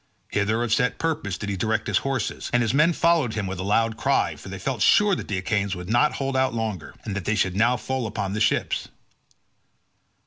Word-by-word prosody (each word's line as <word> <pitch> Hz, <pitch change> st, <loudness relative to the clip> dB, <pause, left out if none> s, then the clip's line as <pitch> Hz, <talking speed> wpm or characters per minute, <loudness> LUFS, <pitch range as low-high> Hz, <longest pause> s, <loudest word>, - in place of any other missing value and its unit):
Hither 110 Hz, +3 st, 0 dB
of 115 Hz, -2 st, 0 dB
set 125 Hz, +1 st, +1 dB
purpose 155 Hz, -12 st, -2 dB
did 100 Hz, -, -5 dB
he 100 Hz, -, -1 dB
direct 110 Hz, +3 st, -1 dB
his -, -, +2 dB
horses, 135 Hz, -5 st, -3 dB
and 120 Hz, 0 st, +3 dB
his 115 Hz, -, 0 dB
men 150 Hz, +5 st, +4 dB
followed 165 Hz, -8 st, +2 dB
him 105 Hz, -2 st, -2 dB
with 95 Hz, -1 st, -5 dB
a -, -, -2 dB
loud 110 Hz, +3 st, +1 dB
cry, -, -, +1 dB
for -, -, -11 dB
they 100 Hz, -, -6 dB
felt 115 Hz, +3 st, -3 dB
sure 205 Hz, -, +5 dB
that -, -, -3 dB
the 100 Hz, -, -2 dB
Achaeans 100 Hz, +1 st, -1 dB
would 90 Hz, +3 st, -6 dB
not 120 Hz, +6 st, +3 dB
hold 135 Hz, -1 st, -2 dB
out 130 Hz, -2 st, +1 dB
longer, 110 Hz, -7 st, -4 dB
and 105 Hz, -, -3 dB
that 100 Hz, -3 st, -4 dB
they 110 Hz, -, +1 dB
should 95 Hz, -3 st, 0 dB
now 120 Hz, +4 st, +3 dB
fall 130 Hz, -2 st, -3 dB
upon 100 Hz, -2 st, -3 dB
the 105 Hz, -, -2 dB
ships. 110 Hz, -, 0 dB
110 Hz, 230 wpm, -24 LUFS, 100-130 Hz, -, sure